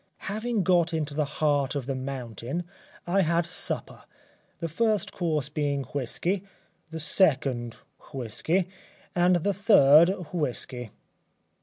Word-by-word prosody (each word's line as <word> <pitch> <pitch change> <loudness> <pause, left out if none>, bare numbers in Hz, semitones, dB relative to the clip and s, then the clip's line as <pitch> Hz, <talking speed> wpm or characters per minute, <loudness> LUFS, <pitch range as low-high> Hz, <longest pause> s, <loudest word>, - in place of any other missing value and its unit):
Having 220 +1 -1
got 170 -1 +3
into 150 -2 -2
the 150 0 0
heart 145 -1 0
of 140 -4 -2
the 135 - -2
mountain 130 - -4 0.4
I 190 +3 +2
had 170 0 +2
supper, 180 +1 -4 0.6
the 165 - -2
first 215 +5 0
course 155 -5 -1
being 145 -2 -1
whisky, 145 - -2 0.5
the 160 0 -6
second 135 - +1 0.4
whisky 140 - -1 0.5
and 180 +1 +4
the 190 +4 +1
third 170 -6 +6 0.2
whisky. 125 -6 -2
155 Hz, 120 wpm, -27 LUFS, 135-180 Hz, 0.6 s, third